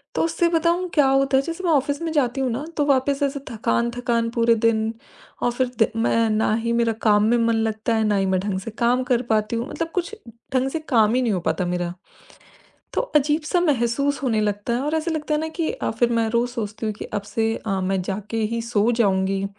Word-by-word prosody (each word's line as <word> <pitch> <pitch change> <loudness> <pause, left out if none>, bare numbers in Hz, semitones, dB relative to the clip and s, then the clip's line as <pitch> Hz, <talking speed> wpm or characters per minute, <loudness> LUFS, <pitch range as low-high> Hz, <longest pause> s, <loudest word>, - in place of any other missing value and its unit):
तो - - +1
उससे 330 +1 +1
बताऊँ 340 +2 +1
क्या 295 -3 +4
होता 270 0 +3
है, 270 - +2
जैसे 335 +5 -5
मैं 340 - +2
ऑफिस 285 +1 +1
में 325 - -2
जाती 270 -3 +1
हूँ 260 - 0
ना, 260 +6 -3
तो 290 - +2
वापस 275 0 +2
ऐसे 280 0 -1
थकान-थकान 235 +1 0
पूरे 230 -1 +3
दिन 220 0 +1 0.5
और 245 - +2
फिर 255 +1 0
द - - +6
मैं 230 0 +2
ना 215 0 +1
ही 235 - 0
मेरा 235 -1 +2
काम 210 -1 +4
में 230 +3 +3
मन 230 -1 +2
लगता 225 +1 0
है, 220 - +1
ना 210 -1 +2
ही 195 - +1
मैं 190 -1 +1
ढंग 195 -1 -2
से 210 +4 -7
काम 240 +3 +1
कर 245 -1 +1
पाती 215 +1 +1
हूँ, 235 +3 -2
मतलब 330 - -3
कुछ 360 +4 -2 0.4
ढंग 260 +1 +2
से 320 - -3
काम 225 -4 +4
ही 255 - +2
नहीं 230 - +1
हो 185 - 0
पाता 180 +2 -1
मेरा। 175 0 -2 1.0
तो - - +1 0.2
अजीब-सा 300 +4 +2
महसूस 280 -2 +1
होने 230 -5 +1
लगता 205 +2 -1
है 245 - 0
और 300 +2 -1
ऐसे 320 +2 -1
लगता 305 -1 -2
है 300 - +1
ना 320 - -3
कि 320 0 -2
अ, - - -3
फिर 235 +2 +1
मैं 230 -1 +1
रोज़ 235 +2 +1
सोचती 220 -2 -4
हूँ 215 - -2
कि - - -8
अब 205 -1 -4
से 225 +2 -1
अ, 195 -3 -2
मैं 190 0 0
जाके 200 +4 -4 0.2
ही 230 - -1
सो 230 -1 +1
जाऊँगी। 195 -4 +1
235 Hz, 235 wpm, -22 LUFS, 215-280 Hz, 1.0 s, द